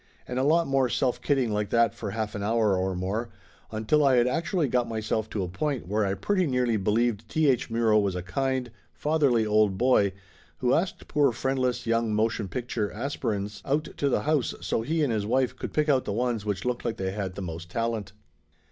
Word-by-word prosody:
And 125 Hz, +1 st, -2 dB
a -, -, +1 dB
lot 165 Hz, +4 st, +4 dB
more 135 Hz, -3 st, +2 dB
self 125 Hz, 0 st, 0 dB
kidding 135 Hz, -6 st, +1 dB
like 105 Hz, -1 st, -1 dB
that 115 Hz, -1 st, +3 dB
for 105 Hz, -, -5 dB
half 110 Hz, +1 st, -3 dB
an 100 Hz, -, -4 dB
hour 110 Hz, -1 st, +2 dB
or 95 Hz, 0 st, -1 dB
more, 100 Hz, +6 st, -2 dB, 0.4 s
until 110 Hz, +8 st, +2 dB
I 135 Hz, -2 st, +5 dB
had 120 Hz, -1 st, +4 dB
actually 165 Hz, +4 st, 0 dB
got 125 Hz, -1 st, 0 dB
myself 110 Hz, -1 st, -2 dB
to 105 Hz, -3 st, -2 dB
a -, -, -3 dB
point 130 Hz, -, -3 dB
where 105 Hz, +3 st, +1 dB
I 95 Hz, -, -1 dB
pretty 185 Hz, -, +1 dB
nearly 125 Hz, -3 st, +1 dB
believed 110 Hz, +2 st, 0 dB
T. 155 Hz, -1 st, +2 dB
H. 130 Hz, -4 st, +2 dB
Muro 115 Hz, -2 st, +3 dB
was 100 Hz, -3 st, 0 dB
a 90 Hz, -, -3 dB
kind, 130 Hz, +5 st, -1 dB, 0.2 s
fatherly 145 Hz, -7 st, +2 dB
old 105 Hz, -2 st, +3 dB
boy 105 Hz, -6 st, +3 dB, 0.4 s
who 125 Hz, 0 st, +1 dB
asked 180 Hz, +3 st, -1 dB
poor 145 Hz, -3 st, +3 dB
friendless 130 Hz, 0 st, -1 dB
young 115 Hz, -1 st, +1 dB
motion 110 Hz, -1 st, 0 dB
picture 115 Hz, -2 st, -3 dB
aspirins 105 Hz, -5 st, -3 dB
out 150 Hz, +3 st, -1 dB
to 140 Hz, -, +1 dB
the -, -, +1 dB
house 150 Hz, -4 st, 0 dB
so -, -, -1 dB
he 155 Hz, +7 st, 0 dB
and 130 Hz, -6 st, +1 dB
his 105 Hz, -2 st, -1 dB
wife 130 Hz, +2 st, +1 dB
could -, -, -6 dB
pick 150 Hz, 0 st, +1 dB
out 135 Hz, -3 st, +3 dB
the 100 Hz, -, -2 dB
ones 120 Hz, -1 st, -1 dB
which 100 Hz, -1 st, -2 dB
looked 125 Hz, -1 st, -1 dB
like 115 Hz, -, -2 dB
they 95 Hz, 0 st, -2 dB
had 95 Hz, -2 st, -4 dB
the 100 Hz, -, -5 dB
most 85 Hz, 0 st, -6 dB
talent. 115 Hz, -1 st, -2 dB
115 Hz, 215 wpm, -27 LUFS, 105-130 Hz, 0.4 s, I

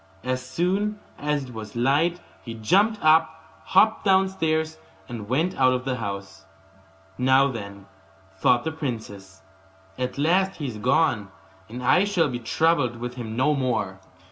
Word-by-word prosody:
As 130 Hz, 0 st, -2 dB
soon 190 Hz, +9 st, -1 dB, 0.2 s
as 150 Hz, -1 st, -1 dB
it 125 Hz, -2 st, -10 dB
was 110 Hz, -1 st, -8 dB
light 145 Hz, +8 st, +2 dB, 0.2 s
he 115 Hz, -2 st, -7 dB
jumped 200 Hz, -, +2 dB
up, 160 Hz, 0 st, +2 dB
hopped 220 Hz, 0 st, +3 dB
downstairs, 160 Hz, -5 st, +1 dB, 0.3 s
and 110 Hz, -4 st, -7 dB
went 160 Hz, +8 st, 0 dB
out 130 Hz, -1 st, +4 dB
of 125 Hz, 0 st, -3 dB
the 130 Hz, -1 st, -1 dB
house. 100 Hz, -6 st, -6 dB, 0.8 s
'Now, 130 Hz, +2 st, +4 dB
then,' 100 Hz, -4 st, -8 dB, 0.5 s
thought 120 Hz, -1 st, +2 dB
the 160 Hz, -, -2 dB
princess, 110 Hz, -, -7 dB, 0.6 s
'at 125 Hz, +1 st, -3 dB
last 185 Hz, +6 st, +2 dB
he 150 Hz, -, -6 dB
is 115 Hz, -5 st, -5 dB
gone, 125 Hz, -4 st, +1 dB, 0.4 s
and 125 Hz, +3 st, -7 dB
I 180 Hz, +10 st, +4 dB
shall 180 Hz, -7 st, +1 dB
be 120 Hz, -1 st, -4 dB
troubled 135 Hz, +1 st, +1 dB
with 120 Hz, +1 st, -6 dB
him 115 Hz, -3 st, -6 dB
no 130 Hz, +5 st, +2 dB
more. 110 Hz, -9 st, -1 dB
130 Hz, 150 wpm, -24 LUFS, 115-160 Hz, 0.8 s, out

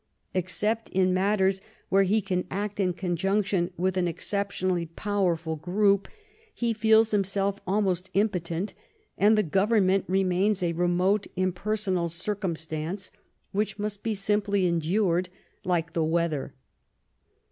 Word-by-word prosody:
Except 210 Hz, +5 st, 0 dB
in 185 Hz, -1 st, +2 dB
matters 190 Hz, 0 st, +2 dB, 0.3 s
where 195 Hz, -, +4 dB
he 205 Hz, +3 st, +2 dB
can 180 Hz, -2 st, -2 dB
act 205 Hz, +2 st, -4 dB
in 185 Hz, -2 st, +2 dB
conjunction 190 Hz, +1 st, 0 dB
with 185 Hz, +2 st, 0 dB
an 180 Hz, -1 st, +2 dB
exceptionally 185 Hz, -1 st, -1 dB
powerful 170 Hz, -3 st, -1 dB
group, 195 Hz, +5 st, +2 dB, 0.5 s
he 235 Hz, -1 st, 0 dB
feels 220 Hz, 0 st, +4 dB
himself 200 Hz, 0 st, 0 dB
almost 190 Hz, -2 st, 0 dB
impotent, 185 Hz, -2 st, 0 dB, 0.4 s
and 215 Hz, +2 st, +4 dB
the 215 Hz, -, +3 dB
government 195 Hz, +2 st, +2 dB
remains 190 Hz, +1 st, +1 dB
a 170 Hz, -1 st, +1 dB
remote 180 Hz, +4 st, +1 dB
impersonal 185 Hz, -1 st, -1 dB
circumstance, 170 Hz, -1 st, -3 dB, 0.4 s
which 210 Hz, +2 st, -1 dB
must 205 Hz, -1 st, -4 dB
be 225 Hz, -2 st, -1 dB
simply 200 Hz, -1 st, +1 dB
endured, 175 Hz, +2 st, +1 dB, 0.3 s
like 170 Hz, -2 st, -1 dB
the 165 Hz, -, +1 dB
weather. 160 Hz, -3 st, -1 dB
190 Hz, 120 wpm, -27 LUFS, 175-205 Hz, 0.5 s, where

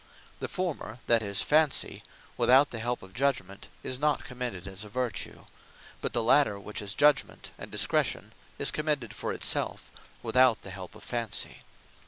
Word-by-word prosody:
The -, -, -3 dB
former, 170 Hz, -, -3 dB
that 115 Hz, -1 st, +4 dB
is, 100 Hz, -2 st, 0 dB
Fancy, 155 Hz, -1 st, +2 dB, 0.3 s
without 135 Hz, +3 st, +5 dB
the 115 Hz, -, -4 dB
help 120 Hz, 0 st, -2 dB
of 95 Hz, 0 st, -13 dB
Judgement, 120 Hz, -7 st, -1 dB, 0.2 s
is 130 Hz, -, -3 dB
not 150 Hz, -1 st, +2 dB
commended 120 Hz, -7 st, -5 dB
as 95 Hz, +1 st, -5 dB
a 105 Hz, -, -10 dB
Vertue: 125 Hz, 0 st, -3 dB, 0.6 s
but -, -, -1 dB
the 120 Hz, -, +1 dB
later 115 Hz, -4 st, +4 dB
which 105 Hz, +2 st, -4 dB
is 100 Hz, -1 st, -2 dB
Judgement, 150 Hz, 0 st, +2 dB
and -, -, -9 dB
Discretion, -, -, 0 dB, 0.2 s
is -, -, +2 dB
commended 150 Hz, -7 st, -1 dB
for -, -, -3 dB
it -, -, -5 dB
selfe, -, -, 0 dB, 0.3 s
without 125 Hz, 0 st, +4 dB
the 95 Hz, -, -7 dB
help 95 Hz, +1 st, -8 dB
of 110 Hz, -, -13 dB
Fancy. 115 Hz, -4 st, -3 dB
120 Hz, 170 wpm, -29 LUFS, 105-135 Hz, 0.6 s, without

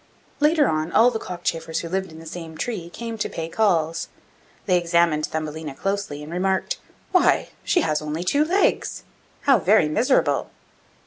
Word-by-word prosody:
Later 300 Hz, 0 st, +4 dB
on, 155 Hz, +2 st, -1 dB
all 240 Hz, +3 st, +5 dB
the 225 Hz, -, -3 dB
other -, -, -10 dB
cockchafers 165 Hz, -2 st, -2 dB
who 170 Hz, -, -6 dB
lived 190 Hz, 0 st, -2 dB
in 160 Hz, -, -11 dB
the 165 Hz, -, -11 dB
same 160 Hz, -1 st, -8 dB
tree 190 Hz, -7 st, -4 dB
came 230 Hz, +4 st, -6 dB
to -, -, -1 dB
pay 165 Hz, -1 st, -4 dB
calls; 165 Hz, -4 st, +1 dB, 0.6 s
they 185 Hz, -, +3 dB
examined 170 Hz, -3 st, +2 dB
Thumbelina 155 Hz, -2 st, -5 dB
closely, 195 Hz, -5 st, -3 dB
and 155 Hz, +3 st, -8 dB
remarked, 190 Hz, +1 st, 0 dB, 0.3 s
'Why, 365 Hz, -, +3 dB
she 355 Hz, -, +2 dB
has 155 Hz, -, 0 dB
only 155 Hz, +3 st, -3 dB
two 285 Hz, +11 st, +2 dB
legs! 370 Hz, +6 st, +1 dB, 0.4 s
How 270 Hz, -5 st, +4 dB
very 195 Hz, -2 st, +4 dB
miserable! 235 Hz, -, +2 dB
175 Hz, 170 wpm, -23 LUFS, 160-220 Hz, 0.6 s, all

